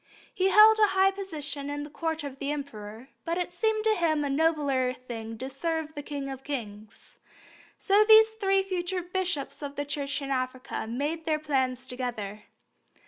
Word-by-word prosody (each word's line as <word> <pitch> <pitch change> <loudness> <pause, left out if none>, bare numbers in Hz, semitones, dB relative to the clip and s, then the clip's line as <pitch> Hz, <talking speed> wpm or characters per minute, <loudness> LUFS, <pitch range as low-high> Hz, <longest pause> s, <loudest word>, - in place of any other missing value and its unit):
He 380 +1 +2
held 430 +2 +8
a 425 - +6
high 385 +1 +5
position 305 -7 -5
at 290 0 -3
the 295 - -8
Court 320 0 -2
of 275 -2 -7
the 280 0 -2
Emperor, 245 -4 -7
but 335 +1 -2
it 355 -1 -2
seemed 435 +4 0
to 440 0 +4
him 320 -6 +1
a 280 - -1
nobler 280 -4 +1
thing 225 -3 -7
to 260 - -5
serve 315 +3 -3
the 290 - -5
King 285 -1 -5
of 270 -1 -7
kings. 215 -7 -7 0.6
So 405 +1 +4
these 440 0 +7
three 390 -3 +1
future 365 -1 -2
bishops 355 -6 -2
of 285 -1 -6
the 285 - -2
Church 285 0 -2
in 275 -1 -5
Africa 255 -2 -3
made 295 +7 -3
their 310 -2 +1
plans 265 -4 -1
together. 235 -5 -5
290 Hz, 180 wpm, -28 LUFS, 260-355 Hz, 0.6 s, held